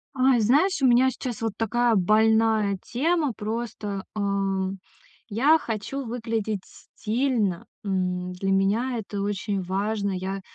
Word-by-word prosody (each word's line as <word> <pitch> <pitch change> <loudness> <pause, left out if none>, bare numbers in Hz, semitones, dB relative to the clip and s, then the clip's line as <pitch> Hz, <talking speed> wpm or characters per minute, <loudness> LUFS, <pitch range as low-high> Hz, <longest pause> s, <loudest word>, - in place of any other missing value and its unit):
Ай! 255 -1 +4
Знаешь, 290 - +3
у 265 - +5
меня 250 +2 +5
сейчас 245 -3 -5
вот 225 -2 -1
такая 235 +1 +2
больная 215 +1 +3
тема, 300 +1 0
просто, 210 -2 -4
э, - - -3 1.1
я 270 +10 +4
хочу 255 +1 -4
выглядеть 225 -3 -2
стильно. 220 -6 -2 0.2
М, 180 -2 -1
для 195 +2 -2
меня 215 +6 +1
это 205 -2 -4
очень 200 0 -2
важно. 200 +2 -1
Я, 190 +1 -3
220 Hz, 125 wpm, -25 LUFS, 195-245 Hz, 1.1 s, у